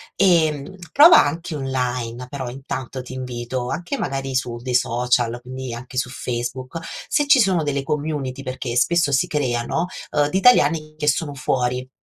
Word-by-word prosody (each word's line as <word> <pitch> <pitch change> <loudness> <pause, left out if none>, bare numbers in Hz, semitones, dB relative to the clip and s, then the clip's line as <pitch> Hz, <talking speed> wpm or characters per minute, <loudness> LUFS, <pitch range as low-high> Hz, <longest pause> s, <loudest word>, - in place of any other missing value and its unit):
Ehm, 165 -3 +2 0.2
prova 325 +4 +8
anche 165 +3 -3
online 125 -3 -3
però, 130 -3 -5
intanto 130 0 -6
ti 130 - -9
invito, 125 -1 -4
anche 180 +11 -3
magari 135 -1 -3
su 120 -2 -1
dei 125 +1 -3
social, 120 0 +1
quindi, 130 0 -6
anche 125 +2 -8
su 125 -1 0
Facebook 125 +4 -4 0.3
se 290 - +1
ci 285 -2 +6
sono 190 -7 +3
delle 140 -2 -1
community 145 -2 -3
perché 130 -2 -4
spesso 155 +4 +2
si 135 - +2
creano, 130 +3 -1 0.2
uhm, 145 -1 +2
di 190 - 0
italiani 155 -9 +4
che 150 - -3
sono 150 +1 +1
fuori 125 -1 -1
130 Hz, 160 wpm, -21 LUFS, 125-155 Hz, 0.3 s, prova